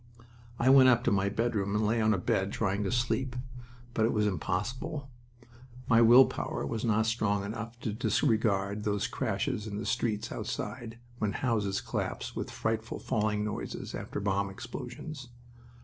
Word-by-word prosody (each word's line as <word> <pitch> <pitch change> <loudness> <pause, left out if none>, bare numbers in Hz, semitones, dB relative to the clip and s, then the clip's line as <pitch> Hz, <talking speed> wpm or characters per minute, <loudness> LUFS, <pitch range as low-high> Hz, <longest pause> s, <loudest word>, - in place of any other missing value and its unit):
I 130 +3 +4
went 130 -1 +8
up 120 -1 +4
to 100 -4 +2
a 100 - +1
bedroom 105 -2 0
and 105 0 +2
lay 115 +2 +2
on 110 0 +3
a 105 - +2
bed, 95 +2 0
trying 100 -1 0
to - - -1
sleep. 130 +1 0 0.6
But 110 - +1
it 115 - +3
was 105 -1 +1
impossible. 120 - -2 0.8
My 115 -1 +5
will 120 +3 +9
power - - -3
was 110 +10 -3
not 110 -2 +2
strong 105 -3 0
enough 115 +3 -6
to 110 - -2
disregard 105 -4 +1
those 105 -1 0
crashes 105 +1 -2
in 100 -1 -4
the 105 - -4
streets 105 -3 -1
outside, 115 -3 -5 0.2
when 105 -2 0
houses 105 -6 0
collapsed - - -4
with - - -3
frightful 110 +1 -2
falling 105 -1 0
noises 105 0 -5
after - - -4
bomb 100 0 0
explosions. 135 +7 -7
110 Hz, 165 wpm, -30 LUFS, 100-120 Hz, 0.8 s, will